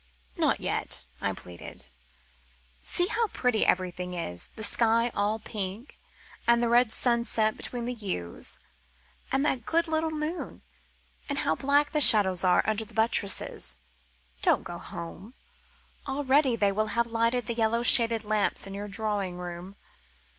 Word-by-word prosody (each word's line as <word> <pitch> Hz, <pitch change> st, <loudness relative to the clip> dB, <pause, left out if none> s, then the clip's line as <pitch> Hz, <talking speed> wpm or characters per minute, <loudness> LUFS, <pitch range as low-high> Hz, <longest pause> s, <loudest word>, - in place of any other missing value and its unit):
"Not -, -, +1 dB
yet," -, -, -1 dB, 0.2 s
I -, -, -1 dB
pleaded. 85 Hz, -7 st, -8 dB, 0.9 s
"See 355 Hz, -, +1 dB
how 455 Hz, +3 st, -1 dB
pretty 250 Hz, -, 0 dB
everything 180 Hz, 0 st, -1 dB
is. 90 Hz, -, -3 dB
The 220 Hz, -, -7 dB
sky 230 Hz, +1 st, +3 dB
all 205 Hz, +2 st, 0 dB
pink, 210 Hz, +2 st, -6 dB, 0.5 s
and 235 Hz, 0 st, +5 dB
the 235 Hz, -, +1 dB
red 240 Hz, -1 st, +3 dB
sunset 235 Hz, -2 st, +1 dB
between 240 Hz, -1 st, -5 dB
the 250 Hz, -, -3 dB
yews, 190 Hz, -, -3 dB, 0.7 s
and 270 Hz, +2 st, +1 dB
that 260 Hz, -5 st, 0 dB
good 335 Hz, +7 st, +1 dB
little 320 Hz, 0 st, -1 dB
moon. 315 Hz, +2 st, -5 dB, 0.7 s
And 280 Hz, -, -2 dB
how 160 Hz, -, +2 dB
black 285 Hz, -, +1 dB
the 300 Hz, -, 0 dB
shadows 195 Hz, -8 st, +7 dB
are 180 Hz, -1 st, +3 dB
under 220 Hz, 0 st, 0 dB
the 220 Hz, -, -14 dB
buttresses. 220 Hz, -3 st, +1 dB, 0.6 s
Don't -, -, +2 dB
go 175 Hz, 0 st, -7 dB
home 185 Hz, +6 st, -9 dB, 0.7 s
already 270 Hz, -1 st, +1 dB
they 205 Hz, -3 st, +1 dB
will 215 Hz, +2 st, -1 dB
have 235 Hz, -, +2 dB
lighted 230 Hz, +1 st, -1 dB
the 235 Hz, -, -1 dB
yellow 230 Hz, +1 st, 0 dB
shaded 230 Hz, -2 st, +7 dB
lamps 210 Hz, -1 st, 0 dB
in 195 Hz, -, -7 dB
your 205 Hz, +1 st, -6 dB
drawing 200 Hz, -3 st, -2 dB
room. 180 Hz, +2 st, -8 dB
225 Hz, 145 wpm, -27 LUFS, 195-250 Hz, 0.9 s, shadows